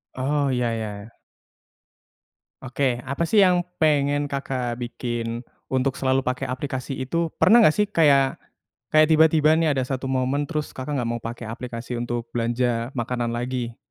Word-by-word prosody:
Oh, 140 +2 0
iya 125 -1 0
iya 110 -1 -3
iya. 110 +3 -15 1.4
Oke, 130 -1 -1
apa, 140 +5 -4
sih, 205 -3 +6
yang 180 -1 +3 0.2
pengen 145 -2 +2
Kakak 130 -4 -3
bikin 120 -1 -4 0.2
untuk 130 0 +1
selalu 130 0 0
pakai 125 +1 -2
aplikasi 130 0 -4
itu? 165 +6 -1
Pernah 235 +2 +6
nggak, 155 -8 +5
sih, 210 - +3
kayak, 145 -9 +3 0.5
kayak 155 +1 +5
tiba-tiba, 155 -1 +5
nih, 160 -4 +2
ada 130 - 0
1 130 0 -3
momen 135 +3 0
terus 150 -2 -3
Kakak 140 +2 -4
nggak 125 - -1
mau 120 -1 -3
pakai 115 0 -6
aplikasi 120 +1 -6
untuk 120 -1 -3
belanja 120 0 0
makanan 120 0 -2
lagi? 120 0 -3
130 Hz, 155 wpm, -23 LUFS, 120-145 Hz, 1.4 s, sih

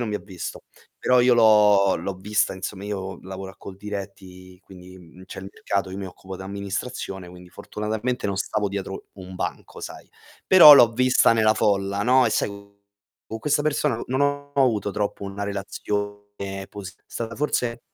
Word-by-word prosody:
non 120 - -2
mi - - -2
ha - - -8
visto, 95 -4 -7 0.4
però 125 -1 +3
io 125 0 +5
l'ho 105 -4 +5
l'ho 95 +3 -4
vista, 105 +3 0
insomma, 95 +1 -6
io 95 -2 -5
lavoro 95 0 -8
a - - -24
Coldiretti 95 -2 -9
quindi, 95 0 -14
mhmm, 90 +1 -15
c'è - - -10
il 95 - -8
mercato, 100 -1 -2
io 95 - -6
mi 95 - -5
occupo 95 +1 -10
d'amministrazione, 100 0 -5
quindi 90 0 -13
fortunatamente 110 +4 -3
non 100 -1 -2
stavo 105 +1 -1
dietro 95 -1 -6
un 95 -1 -10
banco, - - -5
sai. - - -9 0.4
Però 175 -5 +10
l'ho 120 -4 +7
vista 130 0 +4
nella 110 -1 +3
folla, 100 -1 +1
no, 125 +2 +4
e 115 - 0
sai, - - +1
co 100 0 -12 0.5
co 110 - -6
questa 145 +3 +1
persona 150 -4 0
n - - -6
non 130 +2 -1
ho 145 0 -1
avuto 115 -7 +2
troppo 100 0 -3
una 100 +1 -5
relazione 105 +1 -4 0.4
posi 100 -3 -8
è - - -39
stata 115 0 -6
forse 125 -5 -1
100 Hz, 180 wpm, -24 LUFS, 95-115 Hz, 0.5 s, Però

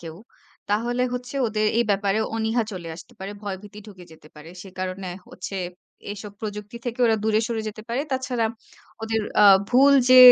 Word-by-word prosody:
কেউ, 165 -2 -8 0.6
তাহলে 240 +4 +1
হচ্ছে 250 +1 -5
ওদের 215 0 0
এই 235 - +4
ব্যাপারে 200 +1 +1 0.2
অনিহা 225 +1 +1
চলে 175 -3 -6
আসতে 235 - -13
পারে, 190 +1 -6
ভয়ভীতি 205 +1 -7
ঢুকে 185 -4 -12
যেতে 155 -1 -16
পারে। 150 +2 -12
সে 195 - -11
কারণে 185 0 -3 0.2
হচ্ছে 195 +2 -7 0.6
এসব 205 0 -8
প্রযুক্তি 210 +1 -6
থেকে 240 0 -4
ওরা 225 - +3
দূরে 220 0 +3
সরে 225 -2 -2
যেতে 215 0 -8
পারে। 240 +3 0
তাছাড়া 255 -3 0 0.6
ওদের 225 0 0 0.2
আ - - +8 0.2
ভুল 275 +3 +6 0.2
যে 255 - +10
215 Hz, 175 wpm, -24 LUFS, 195-235 Hz, 0.6 s, যে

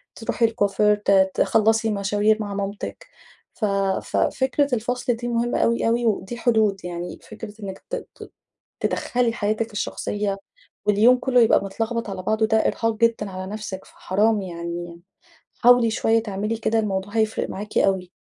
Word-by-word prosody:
تروحي 230 0 0
الكُوافير، 210 -2 +2
ت 195 -2 +3
تخلَّصي 225 +1 +2
مشاوير 205 +2 +2
مع 205 -1 -4
مامتِك، 200 +1 -5 0.5
ف 220 - -2 0.4
ف - - -3
فكرة 265 0 +1
الفصل 245 +2 -1
دي 240 +1 -5
مهمّة 240 0 0
أوي 235 0 +2
أوي 235 +1 +1
ودي 215 +1 -1
حدود 215 -6 +1
يعني 175 0 -5
فكرة 220 -1 -9
إنِّك 190 -1 -6
ت - - -4
ت - - -11 0.5
تِدَخْلي 240 -2 0
حياتِك 220 +1 -1
الشخصيّة 205 -1 -2 0.5
واليوم 220 +5 +5
كلّه 250 -1 +3
يبقى 220 - +4
متلخبط 225 +3 -3
على 185 -1 -5
بعضه 220 +2 +1
ده 220 0 +2
إرهاق 225 0 0
جدًا 230 -2 +1
على 185 +1 -6
نفسِك، 210 -3 -6
فحرام 210 +2 0
يعني 170 -1 -6 0.6
حاولي 245 -1 +6
شويّة 225 0 +2
تعملي 210 +1 -3
كده 225 0 +1
الموضوع 200 -1 -2
هيفرق 220 -1 0
معاكِ 210 +2 -5
أوي. 190 -2 +1
215 Hz, 150 wpm, -23 LUFS, 195-230 Hz, 0.6 s, حاولي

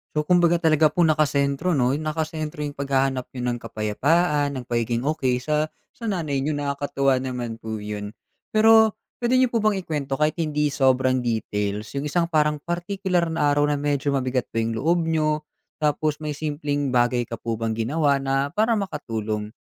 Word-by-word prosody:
So, 150 - +1
kumbaga, 175 +1 +4
talaga 155 -2 +4
po 170 +3 +1
nakasentro 150 +1 +2
'no, 125 -2 +2
nakasentro 155 -1 -3
yung 145 -1 -5
paghahanap 135 -2 0
niyo 125 - -4
ng 120 - -4
kapayapaan, 140 +7 0
ng 130 - -4
pagiging 120 0 -1
okey 140 -4 +1
sa 155 0 +1 0.2
sa 230 - -10
nanay 160 -9 -1
niyo. 145 +2 -1
Nakakatuwa 140 -2 0
naman 125 -3 -4
po 110 -1 -5
’yon. 105 0 -6 0.4
Pero 220 0 +6 0.2
puwede 240 +1 +1
niyo 255 -1 +3
po 230 - +1
bang 215 -1 +2
ikuwento 145 -5 -3
kahit 155 +3 +1
hindi 150 -2 +1
sobrang 130 -2 +2
details 105 -2 -2
yung 140 - -2
isang 170 +3 0
parang 150 -2 +1
partikular 175 0 -1
na 150 -3 +2
araw 145 0 +3
na 150 - +1
medyo 145 0 0
mabigat 130 -2 0
po 115 - -2
yung 115 0 -2
loob 170 +7 +2
niyo, 155 -1 0 0.4
tapos 150 0 0
may 150 - -2
simpleng 145 -3 -2
bagay 120 0 +2
ka 115 - -5
po 115 0 -4
bang 115 -1 -1
ginawa 140 +4 +1
na 135 +1 0
para 220 +3 +2
makatulong? 110 - -3
145 Hz, 175 wpm, -24 LUFS, 125-155 Hz, 0.4 s, Pero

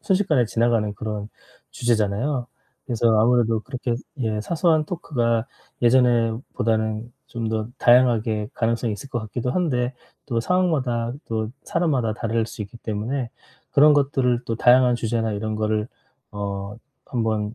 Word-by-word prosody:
순식간에 185 - +2
지나가는 115 -2 +1
그런 105 0 -5 0.4
주제잖아요. 120 +3 0 0.4
그래서 120 -3 0
아무래도 115 -1 +3
그렇게 125 0 -3 0.2
예 110 -4 -1
사소한 160 - +2
토크가 120 -9 -1 0.4
예전에 120 -2 +4 0.2
보다는 110 0 -1
좀 115 -2 -4
더 110 -1 -1
다양하게 115 -4 +3
가능성이 115 0 0
있을 135 +7 -7
것 120 - -2
같기도 120 +3 -3
한데 130 -7 0 0.3
또 120 -4 -1
상황마다 130 -8 0
또 110 -1 -2
사람마다 130 -10 0
다를 115 -1 -1
수 110 - -7
있기 100 +4 -10
때문에 115 +4 -3 0.4
그런 150 +1 +7
것들을 135 -4 +2
또 115 - -1
다양한 125 +1 +5
주제나 115 -1 -1
이런 110 +1 -3
거를 110 0 0 0.4
어 100 0 -5 0.3
한번 110 -3 -1
115 Hz, 320 characters per minute, -23 LUFS, 110-125 Hz, 0.4 s, 그런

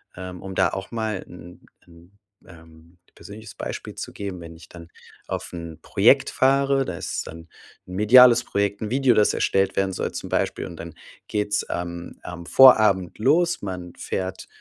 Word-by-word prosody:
ähm, 90 -1 -8
um 95 0 -8
da - - +3
auch 95 0 -7
mal 110 -4 -3
'n 90 0 -14 0.2
'n, 85 +3 -20 0.3
ähm, 80 0 -18 0.2
persönliches 110 +2 -12
Beispiel - - -7
zu - - -7
geben. 100 -3 -6
Wenn 85 0 -10
ich 80 - -16
dann 85 -1 -13 0.4
auf - - -5
'n 85 -2 -8
Projekt 120 +11 +3
fahre, 135 0 +2
da - - -5
ist - - -5
dann 80 +1 -11 0.4
'n 90 - -8
mediales 120 +4 +7
Projekt, 100 0 -2
'n 110 - -3
Video, 130 -2 +3
das 105 -1 +3
erstellt 95 0 0
werden 95 0 +1
soll - - -3
zum - - -6
Beispiel - - -1
und 85 - -11
dann 85 0 -9 0.3
geht's 105 0 -1
am 85 0 -6
am 85 -1 -8
Vorabend 105 -6 +5
los. 165 +9 +2
Man 90 -3 -6
fährt 95 0 -5
95 Hz, 175 wpm, -23 LUFS, 85-110 Hz, 0.4 s, mediales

